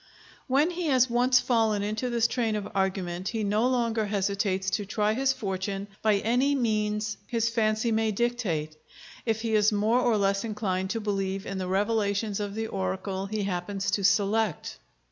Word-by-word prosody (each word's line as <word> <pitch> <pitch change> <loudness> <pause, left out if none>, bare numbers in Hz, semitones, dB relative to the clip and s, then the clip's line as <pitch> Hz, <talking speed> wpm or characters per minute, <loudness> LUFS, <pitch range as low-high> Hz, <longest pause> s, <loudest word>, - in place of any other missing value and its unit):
When 285 +6 +3
he 350 -1 -3
has 255 -3 +3
once 245 +1 +4
fallen 220 -5 +1
into 215 +4 -2
this 235 -1 +1
train 230 -3 -1
of 210 -1 -3
argument, 190 -2 -1
he 225 -2 -2
no 210 +4 +2
longer 230 -4 0
hesitates 195 -1 0
to 205 +2 -1
try 210 +1 +1
his 270 +3 +2
fortune 195 -4 -3
by 215 -1 +3
any 245 +7 +2
means 215 -3 0
his 230 -1 0
fancy 220 0 +1
may 220 0 +1
dictate, 195 -10 -1 0.5
if 225 -1 0
he 225 -1 -2
is 215 0 +4
more 215 +4 +2
or 240 -3 +2
less 195 0 +1
inclined 200 -4 -2
to 225 - -1
believe 195 -2 -2
in 195 -1 -4
the 185 - -3
revelations 205 +1 0
of 205 -1 -4
the 225 0 -2
oracle 190 - -3
he 215 0 -2
happens 195 +1 -2
to 200 0 0
select. 205 +3 +1
210 Hz, 175 wpm, -27 LUFS, 195-230 Hz, 0.5 s, once